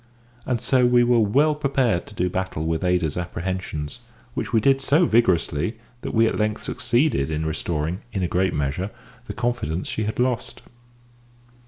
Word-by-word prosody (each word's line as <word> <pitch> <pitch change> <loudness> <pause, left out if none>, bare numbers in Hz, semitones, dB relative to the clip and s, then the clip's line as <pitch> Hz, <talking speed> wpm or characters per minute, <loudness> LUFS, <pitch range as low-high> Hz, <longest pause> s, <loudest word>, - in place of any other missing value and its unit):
And 125 -2 0
so 125 +1 +3
we 120 0 +5
were 120 0 +4
well 140 +9 +3
prepared 135 -10 0
to 105 - -13
do 90 -1 +1
battle 90 -3 -3
with 80 +1 -1
Ada's 90 -4 +1
apprehensions, 90 -4 -4 0.3
which - - -3
we 115 - +4
did 135 +4 +3
so 150 +6 +3
vigorously 95 - +2 0.2
that - - -4
we 115 +1 +5
at 110 - 0
length 105 0 -1
succeeded 125 - +1
in 80 0 -2
restoring, 80 +3 -2
in 95 - -2
a - - +1
great 95 +2 0
measure, 75 +7 -1 0.4
the - - -4
confidence 115 -9 -2
she 110 - -2
had 110 - -3
lost. 125 -1 -1
105 Hz, 170 wpm, -23 LUFS, 85-120 Hz, 0.4 s, we